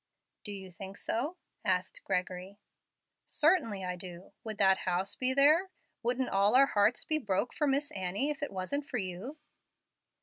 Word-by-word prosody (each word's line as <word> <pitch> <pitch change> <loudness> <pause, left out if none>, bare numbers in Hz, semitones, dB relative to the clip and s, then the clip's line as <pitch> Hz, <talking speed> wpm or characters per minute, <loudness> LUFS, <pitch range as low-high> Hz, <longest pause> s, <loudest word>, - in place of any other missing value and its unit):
"Do 205 - -6
you 190 -2 -8
think 195 +3 -9
so?" 290 +11 -2 0.3
asked 185 -3 -1
Gregory. 185 +1 -3 0.7
"Certain 310 - +3
I 180 0 -3
do. 180 0 -10
Would 220 -2 -5
that 190 -1 +5
house 185 +2 -1
be 255 0 +4
there? 310 +7 +5 0.3
Wouldn't 245 +2 0
all 200 +4 +3
our 275 +2 +8
hearts 215 -2 +2
be 310 -1 +1
broke 205 -1 -1
for 295 - 0
Miss 285 +1 +1
Annie 195 +10 -1
if 295 - -7
it 290 - -2
wasn't 240 +10 -1
for - - -2
you?" 195 - -5
205 Hz, 165 wpm, -31 LUFS, 185-275 Hz, 0.7 s, our